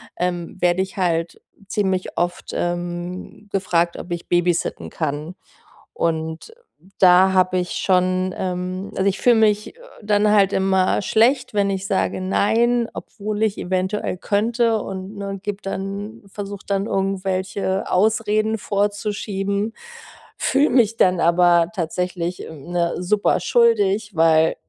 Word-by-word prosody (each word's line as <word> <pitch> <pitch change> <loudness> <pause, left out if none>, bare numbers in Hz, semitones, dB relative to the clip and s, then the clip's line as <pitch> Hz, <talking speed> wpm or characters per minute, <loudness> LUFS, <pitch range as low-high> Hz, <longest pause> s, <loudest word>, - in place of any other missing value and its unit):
ähm, 175 -1 -3
werde 175 +1 +3
ich 190 - -10
halt 170 -3 -1 0.3
ziemlich 190 -3 -1
oft, 175 0 -2
ähm, 175 +3 -4
gefragt, 175 -3 0
ob 175 - -9
ich 175 0 -5
babysitten 175 - 0
kann. 150 +4 -3 0.6
Und 160 - -3 0.4
da 185 +1 +6
habe 185 0 +3
ich 180 -1 -2
schon, 185 0 +1
ähm 185 +1 -4
also, 190 - 0
ich 195 - -4
fühle 245 -1 +5
mich, 215 - +2
äh, - - -22 0.2
dann 210 0 +2
halt 200 -2 +4
immer 190 0 +2
schlecht, 240 +6 +2
wenn 200 -1 +2
ich 195 0 -2
sage: 190 -1 0
„Nein“, 230 +5 +2
obwohl 215 0 -4
ich 215 -2 0
eventuell 185 +3 -2
könnte. 225 +3 +1
Und, 190 +2 -7
ne, 195 -1 -5
gebe 205 -1 -3
dann 200 +3 -5
versuche 200 0 -7
dann 195 0 -1
irgendwelche 190 -1 -1
Ausreden 215 +2 +2
vorzuschieben, 205 0 -2 0.6
fühle 280 +3 +2
mich 230 -4 +3
dann 185 -4 +3
aber 170 0 +4
tatsächlich, 180 0 -3
ähm, 160 +1 -11
ne, 170 -1 0
super 205 0 +1
schuldig, 210 -1 +2
weil, 160 0 +4
190 Hz, 130 wpm, -21 LUFS, 180-210 Hz, 0.6 s, da